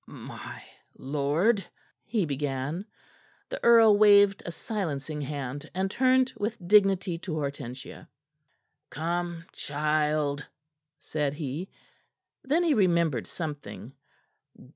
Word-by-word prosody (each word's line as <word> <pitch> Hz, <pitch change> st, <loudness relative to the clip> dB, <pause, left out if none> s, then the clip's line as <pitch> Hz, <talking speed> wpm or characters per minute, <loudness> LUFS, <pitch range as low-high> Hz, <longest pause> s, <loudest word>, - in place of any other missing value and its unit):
"My -, -, -9 dB, 0.3 s
lord 150 Hz, -, +1 dB, 0.2 s
" -, -, -39 dB
he 215 Hz, -6 st, 0 dB
began. 145 Hz, -, -3 dB, 0.6 s
The -, -, -6 dB
earl 225 Hz, -3 st, +7 dB
waved 205 Hz, -1 st, +6 dB
a -, -, -3 dB
silencing 155 Hz, -8 st, -4 dB
hand, 145 Hz, +1 st, -5 dB
and 190 Hz, +1 st, 0 dB
turned 260 Hz, +1 st, +3 dB
with 220 Hz, +3 st, -2 dB
dignity 195 Hz, -4 st, +4 dB
to 175 Hz, -2 st, -5 dB
Hortensia. 140 Hz, -4 st, -6 dB, 0.8 s
"Come, 170 Hz, +1 st, -3 dB
child," 150 Hz, 0 st, 0 dB, 0.5 s
said 145 Hz, -2 st, -2 dB
he. 150 Hz, +5 st, -4 dB, 0.7 s
Then 305 Hz, +6 st, +2 dB
he 330 Hz, -3 st, +3 dB
remembered 170 Hz, -, +2 dB
something. 145 Hz, -7 st, -6 dB
165 Hz, 100 wpm, -28 LUFS, 145-200 Hz, 0.8 s, earl